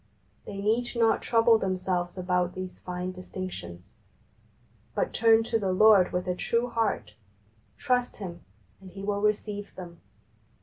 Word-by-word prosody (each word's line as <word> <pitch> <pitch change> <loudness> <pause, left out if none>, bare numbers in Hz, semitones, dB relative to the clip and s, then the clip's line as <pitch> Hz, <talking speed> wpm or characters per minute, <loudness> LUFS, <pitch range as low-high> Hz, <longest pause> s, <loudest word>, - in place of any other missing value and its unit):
They 200 - -7
need 225 +5 0
not 230 -1 +3
trouble 230 -1 +4
them 185 -2 -1
selves 180 -1 -2
about 180 -1 0
these 185 -1 -6
fine 180 0 -4
distinctions, 180 - -8 1.0
but - - -1
turn 225 0 +5
to 225 0 0
the 195 -3 0
Lord 200 -1 +6
with 180 0 -2
a 180 - +1
true 235 +6 0
heart, 225 -2 -1 0.6
trust 250 -2 0
Him, 175 -4 -7 0.4
and 190 - -12
He 195 +2 -9
will 200 0 -1
receive 210 -1 -1
them. 170 -2 -10
195 Hz, 145 wpm, -28 LUFS, 180-225 Hz, 1.0 s, Lord